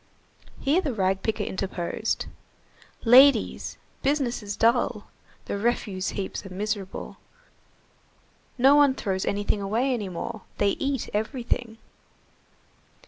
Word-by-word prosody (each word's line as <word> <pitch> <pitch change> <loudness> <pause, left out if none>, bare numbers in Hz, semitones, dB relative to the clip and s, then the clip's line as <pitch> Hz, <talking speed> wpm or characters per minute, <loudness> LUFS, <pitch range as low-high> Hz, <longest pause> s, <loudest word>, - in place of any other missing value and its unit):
Here 305 +7 +2
the 285 -9 -3
rag 190 -1 +1
picker 220 -1 -1
interposed:— 190 +2 -2 0.8
"Ladies, 255 0 +5 0.2
business 270 -4 0
is 205 -1 -5
dull. 230 -2 +1 0.3
The 200 - -3
refuse 205 -4 -1
heaps 195 -2 -4
are 195 - -9
miserable. 200 0 -4 1.4
No 265 +3 +6
one 285 -2 +5
throws 190 -5 -2
anything 205 0 -1
away 230 +7 0
any 210 -6 -3
more. 195 +5 -5 0.2
They 205 - +3
eat 275 +4 -2
everything." 230 +1 -2
220 Hz, 110 wpm, -26 LUFS, 200-255 Hz, 1.4 s, No